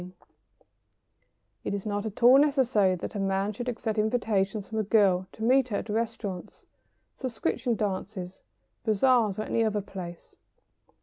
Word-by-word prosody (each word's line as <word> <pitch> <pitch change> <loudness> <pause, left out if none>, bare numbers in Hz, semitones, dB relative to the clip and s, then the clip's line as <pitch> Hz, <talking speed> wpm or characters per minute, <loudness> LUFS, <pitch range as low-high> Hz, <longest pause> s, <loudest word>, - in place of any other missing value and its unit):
] - - -47
It - - -2
is 200 - -5
not 205 0 -2
at 215 +2 -7
all 255 +3 +8
necessary 255 -10 +3
that 180 - -6
a 205 - -4
man 195 +1 0
should 245 +4 -4
accept 220 -2 -2
invitations 215 -3 0
from 220 - -3
a - - +1
girl 195 -3 +3
to 220 - -7
meet 260 +2 +4
her 210 -4 -2
at - - -6
restaurants, 215 -4 -4 0.5
subscription 245 -1 -1
dances, 190 -2 -4 0.4
bazaars, 220 -1 +3
or 215 - -2
any 230 - 0
other 210 -2 0
place. 180 -3 -9
215 Hz, 150 wpm, -28 LUFS, 195-230 Hz, 0.5 s, all